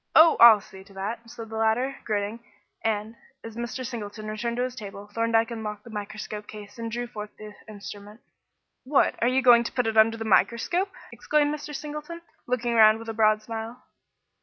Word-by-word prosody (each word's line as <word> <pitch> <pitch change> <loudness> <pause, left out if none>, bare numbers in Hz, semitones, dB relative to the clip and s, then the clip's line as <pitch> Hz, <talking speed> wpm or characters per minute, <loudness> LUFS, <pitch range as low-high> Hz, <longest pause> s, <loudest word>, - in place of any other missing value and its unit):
"Oh, 320 0 +8
I'll 225 -3 +9
see 190 -2 -13
to 195 -1 -18
that," 225 +4 -5
said 230 -1 -9
the 220 - -6
latter, 240 +5 +1
grinning; 210 +1 -2 0.4
and, 220 0 -1 0.3
as 225 -1 -9
Mr. 240 +2 -4
Singleton 215 -3 -6
returned 235 +2 -3
to 245 - +1
his 255 0 -3
table, 205 -4 -9
Thorndyke 230 +2 +1
unlocked 210 -2 -5
the 235 - -12
microscope 210 0 -6
case 210 +1 -11
and 230 0 -4
drew 240 +2 -3
forth 210 -3 -7
the 215 -1 -10
instrument. 205 0 -10 0.6
"What, 275 +2 +3
are 235 - +3
you 260 +1 +2
going 240 -2 +7
to - - -5
put 250 -2 0
it 225 0 -1
under 225 +1 +5
the 225 - -5
microscope?" 235 - +2 0.2
exclaimed 295 -1 +1
Mr. 295 0 -6
Singleton, 300 +3 -7 0.2
looking 245 -1 -1
round 220 -1 +7
with 225 0 -9
a - - -3
broad 215 -1 +3
smile. 225 +2 -7
225 Hz, 190 wpm, -26 LUFS, 215-245 Hz, 0.6 s, I'll